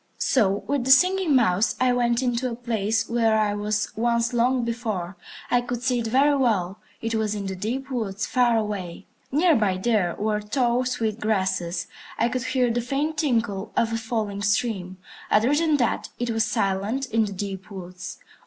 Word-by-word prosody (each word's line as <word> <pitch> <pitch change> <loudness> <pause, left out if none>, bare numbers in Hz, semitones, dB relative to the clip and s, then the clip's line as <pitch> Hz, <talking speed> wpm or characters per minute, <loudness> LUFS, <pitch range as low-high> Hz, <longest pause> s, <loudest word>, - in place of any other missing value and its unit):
So 205 -6 +1
with 280 -2 0
the - - -1
Singing 360 +2 +5
Mouse 215 -4 +3
I 255 -1 +3
went 240 0 +1
into 250 0 0
a 235 - -4
place 225 -2 -1
where 225 -2 +2
I 210 -1 +1
was 210 0 -2
once 235 +1 +1
long 245 +1 +2
before. 215 -6 -3 0.4
I 245 - +4
could 245 0 -5
see 250 -1 +1
it 230 - -2
very 275 +5 +3
well. 210 -8 0 0.2
It 225 0 -1
was 215 -1 0
in 200 -1 -4
the 190 0 -3
deep 255 +8 -4
woods, 220 -4 -2
far 245 -2 +2
away. 195 -4 -4 0.3
Near 325 +5 +4
by 200 -4 +1
there 190 -4 +1
were 210 0 0
tall, 245 +3 0
sweet 230 -4 -2
grasses. 190 -5 -1 0.3
I 235 - +2
could 255 0 -3
hear 255 -2 +1
the 240 +1 0
faint 290 +5 -2
tinkle 225 -7 -1
of 230 -1 +2
a - - 0
falling 220 -3 -3
stream. 205 -3 -1 0.3
Other 230 +6 +3
than 310 0 +2
that, 240 -4 0
it 240 -1 -2
was 225 0 +1
silent 210 +4 -1
in 225 -3 +1
the 200 - -5
deep 195 +1 -6
woods. 180 -2 -8
225 Hz, 185 wpm, -24 LUFS, 205-250 Hz, 0.4 s, Singing